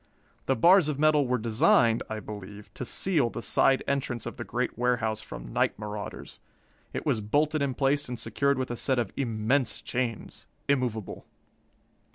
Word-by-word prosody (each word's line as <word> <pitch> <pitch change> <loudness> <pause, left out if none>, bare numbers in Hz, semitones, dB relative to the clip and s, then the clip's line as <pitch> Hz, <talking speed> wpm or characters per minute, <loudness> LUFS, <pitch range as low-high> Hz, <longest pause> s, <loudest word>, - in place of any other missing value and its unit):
The - - +3
bars 175 - +5
of 145 - -2
metal 150 -2 +3
were 125 0 +1
designed, 115 0 +3
I 110 0 -3
believe, 105 -1 -9
to - - -5
seal 150 -1 +1
the - - -6
side 135 -1 +3
entrance 130 -4 -2
of - - -6
the 120 - -4
great 120 +1 -2
warehouse 115 -3 0
from - - -9
night - - +1
marauders. 105 -1 -7 0.5
It - - -5
was 110 - +1
bolted 150 +8 +1
in 135 -3 0
place 140 +1 +1
and 125 - -4
secured 140 +5 0
with 130 -1 -2
a - - -2
set 130 +2 0
of 115 -5 -1
immense 115 0 0
chains, 120 -3 -4 0.2
immovable. 125 -7 -1
125 Hz, 170 wpm, -28 LUFS, 110-140 Hz, 0.5 s, bars